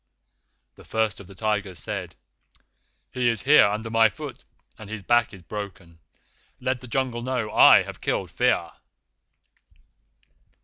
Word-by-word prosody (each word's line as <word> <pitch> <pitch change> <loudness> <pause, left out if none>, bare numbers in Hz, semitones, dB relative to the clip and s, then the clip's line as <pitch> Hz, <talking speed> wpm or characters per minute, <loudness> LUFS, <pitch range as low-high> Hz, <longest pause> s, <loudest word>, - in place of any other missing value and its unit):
"The - - -17
First 110 -2 -1
of 100 - -12
the 100 - -14
Tigers 105 -3 -2
said: - - -5 1.0
'He 125 -2 +1
is 115 -3 -2
here 145 -4 +6
under 110 +2 -4
my 115 0 +5
foot, 140 +3 -9 0.4
and 110 -2 -10
his 110 -2 -6
back 120 +3 +2
is 95 -3 -13
broken. 90 -3 -8 0.6
Let 130 0 -1
the 125 - -10
Jungle 125 -1 -2
know 125 -3 -2
I - - +7
have - - -10
killed - - -2
Fear. - - +1
110 Hz, 140 wpm, -24 LUFS, 100-125 Hz, 1.0 s, I